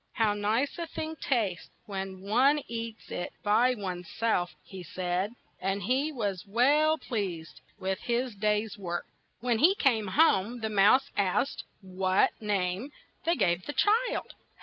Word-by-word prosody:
"How 220 -2 +2
nice 220 +10 0
a 335 - -3
thing 315 0 -5
tastes 215 -13 -1 0.2
when 190 -2 -5
one 255 +9 +3
eats 230 -1 -6
it 175 - -4
by 230 +5 +4
one's 180 -4 -5
self," 215 -6 0
he 190 -2 -9
said, 180 +4 -2 0.3
and 195 +1 -1
he 265 - +1
was 205 - -3
well 290 +9 +4
pleased 190 - -4 0.2
with 190 0 -2
his 240 0 -1
day's 210 +1 -1
work. 175 -2 -3 0.4
When 240 -2 +1
he 360 +8 +6
came 230 - +2
home, 235 -2 +3
the 220 - -1
mouse 215 +7 +4
asked 200 +7 0 0.2
what 185 0 +2
name 200 +4 -1 0.3
they 335 +1 +3
gave 180 -6 +1
this 290 - -4
child. 455 +4 +1
210 Hz, 150 wpm, -29 LUFS, 190-255 Hz, 0.4 s, he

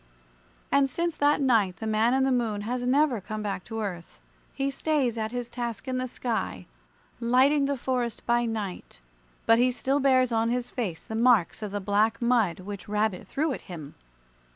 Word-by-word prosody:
And 280 -1 +4
since 340 +3 -2
that 290 0 +3
night 220 -9 +3
the 220 - -6
Man 220 +3 +2
in 265 - +2
the 265 - +2
Moon 225 -5 0
has 245 +4 -3
never 265 -4 +3
come 215 +2 -5
back 200 -3 -3
to 225 0 -4
earth. 180 -5 -6 0.3
He 275 0 -2
stays 275 -5 0
at 220 -1 -3
his 245 -1 -4
task 235 0 -5
in 255 -1 -1
the 255 - -2
sky, 230 - -3 0.5
lighting 260 +5 +3
the 280 -1 -1
forest 245 -2 -2
by 240 0 +2
night; 215 -5 -5 0.5
but 230 0 +5
he 250 +1 +4
still 270 +3 0
bears 260 -2 +3
on 225 0 +1
his 245 0 -2
face 195 -10 -4
the - - -7
marks 225 -5 +3
of 210 - -3
the 205 - -2
black 210 +3 +1
mud 230 -8 +2
which 200 0 -8
Rabbit 210 -3 -1
threw 300 0 -1
at - - -6
him. 155 -5 -8
235 Hz, 190 wpm, -27 LUFS, 215-255 Hz, 0.5 s, but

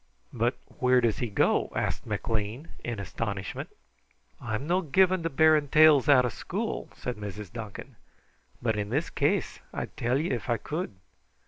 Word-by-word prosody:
"But 120 +2 +1 0.2
where 125 0 +5
does 115 -4 +1
he 120 - -1
go?" 100 - +2
asked - - -2
McLean 110 +7 -2
in 120 -3 -3
astonishment. 100 0 -4 0.7
"I'm 115 +3 -3
no 180 +4 +2
given 185 +3 +3
to 165 - -1
bearing 155 0 +4
tales 150 -2 +6
out 130 -3 +7
of 120 - -2
school," - - -4
said 125 -2 -4
Sarah 105 0 -6
Duncan, 110 -4 -8 0.7
"but 110 -2 +1
in 105 0 -3
this 145 +8 -1
case - - 0
I'd - - -5
tell 120 +2 +1
ye 160 +5 -1
if 120 - -3
I 120 - +2
could. 155 - -4
125 Hz, 160 wpm, -28 LUFS, 110-150 Hz, 0.7 s, out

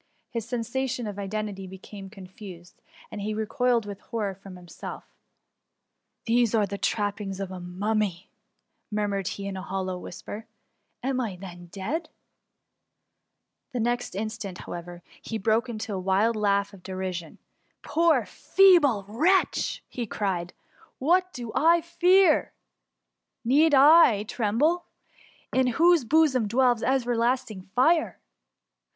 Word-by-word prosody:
His 230 -2 -4
sensations 245 0 -2
of 205 -1 -6
identity 200 -1 -4
be 190 +1 -9
came 195 0 -10
confused, 185 -3 -12 0.3
and 210 - -6
he 215 +1 -2
recoiled 235 +1 +1
with 200 -1 -7
horror 210 -4 -3
from 195 0 -12
himself: 180 -1 -9
^^ - - -35 1.2
These 235 -1 +2
are 215 -2 +3
the 200 0 -6
trappings 205 -2 -2
of 195 -1 -4
a 185 - -6
mummy 190 +1 -2 0.3
!"' - - -45 0.3
murmured 205 -2 -1
he 200 - -4
in 200 -1 -4
a 190 - -5
hollow 185 -1 -3
whisper. 205 +5 -8 0.6
Am 260 0 0
I 215 -6 -3
then 175 -2 -10
dead 205 - -4
?^ - - -22 1.6
The 250 - -2
next 240 -2 -1
instaat, 215 -2 -4
how^ - - -6
ever, 175 0 -9 0.2
he 225 - -4
broke 220 +4 +1
into 220 -2 -5
a 190 - -2
wild 195 +5 +2
laugh 200 -1 +1
of 195 - -13
derision 185 -3 -5
t— - - -45 0.2
*' - - -45
Poor, 325 +2 +2
feeble 315 - +4
wretch!^ 325 - +1 0.3
cried 180 -4 -2
he; - - -41 0.2
*' - - -28
what 365 +6 +2
do 240 -6 -7
I 335 +2 +4
fear? 355 0 +3 0.4
— - - -56
Need 290 +5 +5
I 275 -7 +7
tremble^ 255 +12 +1 0.7
in 260 0 +3
whose 330 +3 +4
bosom 275 -5 +3
dwells 245 +1 +2
everlasting 245 -4 0
fire 315 +6 +3
215 Hz, 145 wpm, -26 LUFS, 195-260 Hz, 1.6 s, I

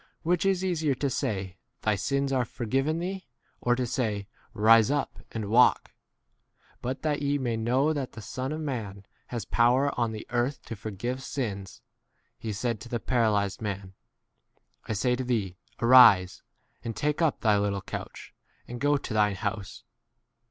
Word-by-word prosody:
which 175 +2 +1
is 190 -1 +1
easier 160 -6 +1
to 140 +1 -1
say, 95 -5 -2 0.3
Thy 110 - +3
sins 140 +7 0
are 130 -2 +2
for 120 +1 -6
given 135 +7 +1
thee; 185 +2 -4 0.3
or 120 0 +2
to 125 0 -1
say, 110 -5 -2 0.2
Rise 110 +2 +5
up 145 -1 -1
and 110 - -4
21 100 - -5
walk? 125 +2 +4 0.9
But 130 +2 -4
that 150 -2 0
ye 145 0 +1
may 120 -4 -1
know 125 +7 +2
that 140 -4 -4
the 110 - -8
Son 130 +6 -4
of 155 +1 -3
man 105 -9 -5 0.2
has 120 -5 -4
power 125 +4 +3
on 115 -2 +1
the 110 -1 -7
earth 125 +3 -1
to 115 - -6
forgive 110 +5 -4
sins, 100 -9 -5 0.6
he 110 - -4
said 115 +1 -2
to 120 - -10
the 120 - -2
paralyzed 110 -6 +1
man, 100 -2 -4 0.9
I - - -2
say 125 +4 +1
to 130 - -3
thee, 105 -8 -1 0.2
Arise, 115 -7 +7 0.4
and 115 -1 -4
take 150 +8 -1
up 160 -3 +1
thy 105 -2 +3
little 100 -1 -1
25 - - -29 0.2
couch - - -13 0.3
and 120 0 -7
go 145 0 +3
to 135 - -6
thine 105 -2 +3
house. 100 0 -4
120 Hz, 175 wpm, -28 LUFS, 105-135 Hz, 0.9 s, Arise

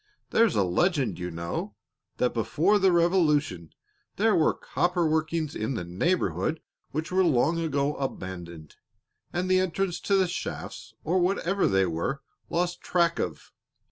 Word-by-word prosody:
There's 230 -1 +3
a 100 - +3
legend, 140 - +1
you 90 0 -3
know, 85 0 -4 0.4
that 125 - +1
before 165 - +2
the 190 -1 +4
Revolution 155 - +2 0.5
there 215 0 +3
were 160 -3 +4
copper 175 -1 0
workings 155 0 0
in 110 +5 -2
the 90 - -3
neighborhood 160 - 0 0.3
which 155 +4 -4
were 190 +1 +3
long 160 +1 +2
ago 145 -3 0
abandoned 90 - -6 0.5
and 180 +1 -1
the 185 0 +4
entrance 185 0 -1
to 200 - +1
the 190 -1 +3
shafts, 175 - -6
or 180 +4 +1
whatever 190 +1 +1
they 95 0 +3
were, 85 - -3 0.3
lost 175 +1 -1
track 170 -2 +1
of. - - -4
160 Hz, 145 wpm, -27 LUFS, 115-180 Hz, 0.5 s, the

